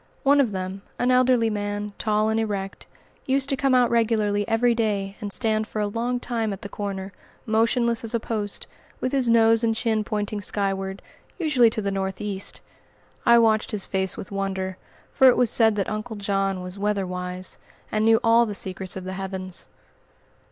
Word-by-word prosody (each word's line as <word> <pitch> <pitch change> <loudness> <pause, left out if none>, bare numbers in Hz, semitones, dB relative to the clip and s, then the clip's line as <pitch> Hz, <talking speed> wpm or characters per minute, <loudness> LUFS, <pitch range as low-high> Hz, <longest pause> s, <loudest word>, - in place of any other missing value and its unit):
One 285 0 +5
of 255 - +1
them, 190 0 -5 0.2
an 245 +1 +2
elderly 250 -3 +3
man, 205 0 -3
tall 215 0 +1
and 220 0 +1
erect, 200 -3 -4 0.4
used 270 0 +1
to 275 - +2
come 270 -1 +2
out 245 -1 +4
regularly 215 -3 +1
every 235 +1 +3
day, 205 -4 -1
and 205 -1 -4
stand 220 -1 +1
for 215 - -5
a 210 - +1
long 235 +4 -2
time 230 -3 -2
at 195 - -7
the 205 - -6
corner, 195 -1 -5 0.3
motionless 230 +1 +1
as 230 +1 -3
a - - +1
post, 210 -3 -3 0.3
with 255 - -1
his 265 -4 +2
nose 225 0 +5
and 225 -1 +2
chin 220 -2 0
pointing 210 0 -3
skyward, 195 -1 -2 0.3
usually 295 -9 +4
to 220 -1 -3
the 200 - -1
northeast. 195 +1 -3 0.7
I 235 0 +8
watched 220 -2 +3
his 205 -3 -2
face 190 -1 -1
with 190 - -8
wonder, 190 -1 -3 0.3
for 265 - +5
it 250 - +6
was 245 -3 +4
said 220 -2 +4
that 200 -2 -1
"Uncle 215 +2 -4
John" 195 -2 -1
was 180 +2 -8
"weatherwise," 185 -3 -3 0.3
and 215 0 +1
knew 225 0 +5
all 230 0 +5
the 205 - -4
secrets 190 -1 -2
of 190 - -6
the 185 +1 -5
heavens. 190 -1 -5
215 Hz, 185 wpm, -24 LUFS, 195-230 Hz, 0.7 s, I